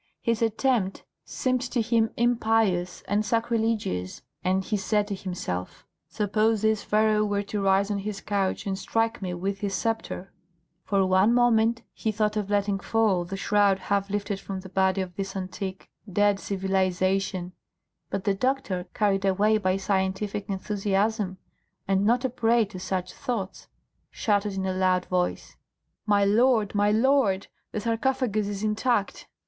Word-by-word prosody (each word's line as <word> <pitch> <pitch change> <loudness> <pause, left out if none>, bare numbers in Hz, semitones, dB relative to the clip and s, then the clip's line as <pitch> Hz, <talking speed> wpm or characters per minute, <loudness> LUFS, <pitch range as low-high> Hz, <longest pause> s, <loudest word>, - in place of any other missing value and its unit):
His 230 -1 0
attempt 225 -3 +1 0.2
seemed 255 -1 -1
to 255 -1 -2
him 225 -1 +2
impious 225 -7 +1
and 205 +2 0
sacrilegious, 225 - -1 0.2
and 185 +1 +1
he 215 - -1
said 205 +1 0
to - - -1
himself, 180 - -5 0.2
"Suppose 215 +1 +1
this 220 -1 +2
Pharaoh 215 0 +2
were 205 -1 0
to 205 0 -3
rise 195 +1 +2
on 200 - -1
his 200 0 -4
couch 195 -1 -1
and 195 -1 -1
strike 225 +3 -1
me 180 -2 -3
with 195 +3 -3
his 195 -1 -2
sceptre." 225 -3 -3 0.5
For 195 -2 +2
one 190 +5 +4
moment 235 -1 +3
he 220 - -2
thought 215 0 0
of 210 -2 -2
letting 200 -1 +1
fall 205 -5 +1
the 195 +3 -5
shroud 200 -1 +3
half 200 +1 -1
lifted 205 0 -2
from 195 -1 -6
the 190 - -11
body 190 0 +2
of 180 -2 -6
this 195 0 -4
antique, 190 0 -5 0.2
dead 205 +1 +3
civilisation, 190 -1 0 0.6
but 195 -1 -3
the 200 - +2
doctor, 205 -5 -1
carried 195 -2 +1
away 205 +3 +3
by 185 -1 +1
scientific 195 +1 -1
enthusiasm, 200 0 -1 0.5
and 195 0 +2
not 245 +3 +2
a - - +1
prey 230 -1 +3
to 195 -2 -9
such 185 -1 -3
thoughts, 210 -7 -4 0.4
shouted 205 -2 0
in 190 0 -2
a 190 - 0
loud 185 -1 +2
voice, 180 -1 -2 0.5
"My 205 -1 +4
lord, 220 0 +3
my 205 0 +3
lord, 220 -3 +3 0.3
the - - -2
sarcophagus 230 -2 0
is 205 0 -4
intact!" 215 0 0
205 Hz, 155 wpm, -26 LUFS, 190-220 Hz, 0.6 s, one